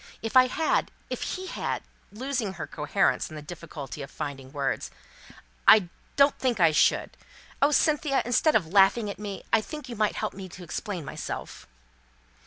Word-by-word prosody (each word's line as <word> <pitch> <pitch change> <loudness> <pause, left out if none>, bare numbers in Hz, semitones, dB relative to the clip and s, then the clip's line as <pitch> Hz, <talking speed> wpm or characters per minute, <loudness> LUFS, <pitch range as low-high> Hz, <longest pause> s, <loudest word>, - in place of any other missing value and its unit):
If 225 - -4
I 255 0 +8
had 315 +5 +1 0.2
if - - -3
he 370 +1 -3
had," - - -3 0.3
losing 245 -2 -2
her 165 -4 -5
coherence 180 +7 0
in 155 - -9
the 150 - -6
difficulty 155 -4 -8
of 140 - -7
finding 135 -2 -6
words, 140 -3 -2 0.8
"I 195 -5 +7 0.3
don't 280 0 +5
think 245 -5 0
I 165 -3 +6
should, 150 - +2 0.5
oh, 280 - +6
Cynthia, 300 -2 +2
instead 245 +6 +3
of 200 - +3
laughing 195 +5 +4
at - - -10
me, 205 -2 -6
I 225 - +5
think 295 +2 -8
you 240 - -5
might 215 -1 +1
help 215 - -2
me 190 -1 -8
to 180 +1 -10
explain 175 0 -5
myself!" - - -6
205 Hz, 175 wpm, -27 LUFS, 165-255 Hz, 0.8 s, I